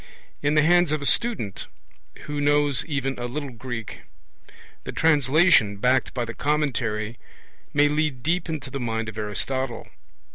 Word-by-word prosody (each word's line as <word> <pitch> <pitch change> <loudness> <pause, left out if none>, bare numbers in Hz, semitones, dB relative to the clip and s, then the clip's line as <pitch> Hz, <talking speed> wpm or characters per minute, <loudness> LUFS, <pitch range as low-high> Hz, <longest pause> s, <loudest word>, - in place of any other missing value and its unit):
In 145 +1 +1
the 150 - +5
hands 175 0 +4
of 155 - +1
a 140 - -5
student 220 - 0 0.5
who 145 -1 -4
knows 145 -2 +2
even 135 -3 -2
a 120 - -3
little 140 +2 -5
Greek, 120 -1 -6 0.8
the - - -5
translation, 150 - +4
backed 125 +5 +2
by 120 -2 -1
the 115 - -6
commentary, 120 -6 -1 0.5
may 145 0 +4
lead 150 -4 -1
deep 170 +3 0
into 155 -5 -5
the 140 - -4
mind 115 -2 -2
of 110 - -10
Aristotle. 120 +4 -3
135 Hz, 150 wpm, -24 LUFS, 120-150 Hz, 0.8 s, the